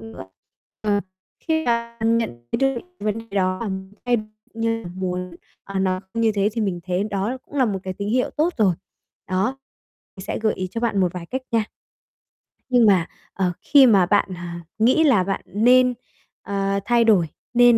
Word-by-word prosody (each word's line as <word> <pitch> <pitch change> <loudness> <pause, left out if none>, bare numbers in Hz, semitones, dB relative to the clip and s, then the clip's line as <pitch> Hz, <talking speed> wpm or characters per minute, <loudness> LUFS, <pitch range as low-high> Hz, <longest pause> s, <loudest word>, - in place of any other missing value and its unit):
nữa. 110 -4 -10 0.6
Ờ. 205 -1 +1 0.4
Khi 320 -1 -1
bạn 235 -1 +1
nhận 120 - -4
thấy - - +1 0.2
dược - - -4 0.2
vấn 210 +1 -1
đề 225 - -9
đó 185 -1 +1
bạn 190 -3 -5
thay 245 - +3 0.4
cũng 225 0 -6
như 225 0 0
là 175 - -7
muốn, 180 -1 -4 0.3
à, 195 -1 -4
nó 185 -1 0
như 230 -1 +2
thế 200 0 +2
thì 230 - -2
mình 185 -4 -1
thấy 185 +2 0
đó 210 +4 -2
cũng - - -17
là 265 - +4
một 200 -5 -1
cái 185 -1 -4
tín 200 0 -3
hiệu 250 +3 +1
tốt 325 +3 0
rồi. 195 -5 +4 0.5
Đó, 195 +9 0 0.6
thì 190 - -8
sẽ - - -3
gợi 215 - +2
ý 185 0 -4
cho 230 - -4
bạn 225 -4 +1
một 180 -2 +2
vài 175 -2 -7
cách 260 +6 -4
nha. 225 -2 +2 1.1
Nhưng 245 -2 +5
mà, 190 -5 +5 0.3
ờ, 185 -2 0
khi 285 -2 +6
mà 200 -7 +5
bạn, 200 +1 +2
à, 175 0 -7 0.2
nghĩ 255 +8 +4
là 260 -11 +4
bạn 195 +1 -2
nên, 250 +5 +4 0.5
a, 195 0 -1
thay 240 -1 +4
đổi, 205 -7 +4 0.3
nên 240 -1 +6
205 Hz, 195 wpm, -22 LUFS, 185-235 Hz, 1.1 s, khi